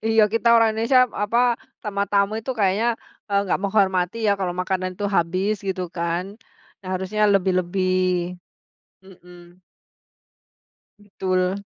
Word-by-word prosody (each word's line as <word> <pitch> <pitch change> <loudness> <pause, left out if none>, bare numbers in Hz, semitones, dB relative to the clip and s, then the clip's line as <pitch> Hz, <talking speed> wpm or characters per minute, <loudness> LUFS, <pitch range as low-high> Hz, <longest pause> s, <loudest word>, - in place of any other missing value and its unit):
Iya 225 0 +4
kita 230 +1 +1
orang 225 -1 +5
Indonesia 255 +4 +4 0.2
apa, 210 +3 +1 0.5
sama 200 -1 -1
tamu 200 0 +2
itu 245 - -5
kayaknya, 200 +2 +2 0.4
eee, 200 0 +2
enggak 190 - -1
menghormati 190 -2 +1
ya 205 - +4
kalau 180 -2 -2
makanan 185 0 -2
tuh 205 - -1
habis 185 +5 +1
gitu 185 -1 -2
kan. 170 +1 -1 0.6
Nah, 185 - -9
harusnya 190 +3 -2
lebih-lebih. 185 0 +1 1.1
Mhm. 180 -1 -17 1.4
Betul. 190 -1 -2
190 Hz, 120 wpm, -22 LUFS, 185-205 Hz, 1.4 s, orang